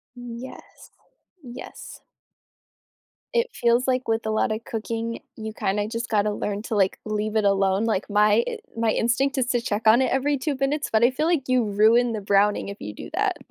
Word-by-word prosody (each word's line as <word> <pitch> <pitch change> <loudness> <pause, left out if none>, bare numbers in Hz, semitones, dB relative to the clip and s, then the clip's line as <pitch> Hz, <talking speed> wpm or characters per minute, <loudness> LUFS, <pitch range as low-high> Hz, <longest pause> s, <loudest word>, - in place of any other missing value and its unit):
Yes, 245 +1 -10 0.5
yes. 245 -2 -10 1.3
It 475 0 +1
feels 240 +2 +1
like 255 0 0
with 225 0 0
a - - 0
lotta 215 0 0
cooking, 230 0 -4 0.2
you 220 -1 -6
kinda 205 0 -1
just 230 +1 -4
gotta 210 -1 +1
learn 205 0 -3
to, 225 - -3
like, 195 -2 +1
leave 215 0 -3
it 215 -1 +2
alone. 195 0 +2
Like, 215 -4 -1
my 210 +2 +4
i - - -4 0.2
my 225 -1 +2
instinct 265 +5 +1
is 250 - 0
to 245 -1 +1
check 220 -1 -2
on 230 +4 +6
it - - 0
every 280 +2 +1
2 280 +2 -2
minutes, 280 +3 -1
but 220 +1 +3
I 240 - +6
feel 260 +4 -2
like 320 -6 0
you 255 -1 +3
ruin 220 +4 +3
the 215 - -3
browning 200 +1 +2
if 200 - -8
you 105 - -7
do - - -9
that. - - 0
225 Hz, 195 wpm, -24 LUFS, 210-250 Hz, 1.3 s, on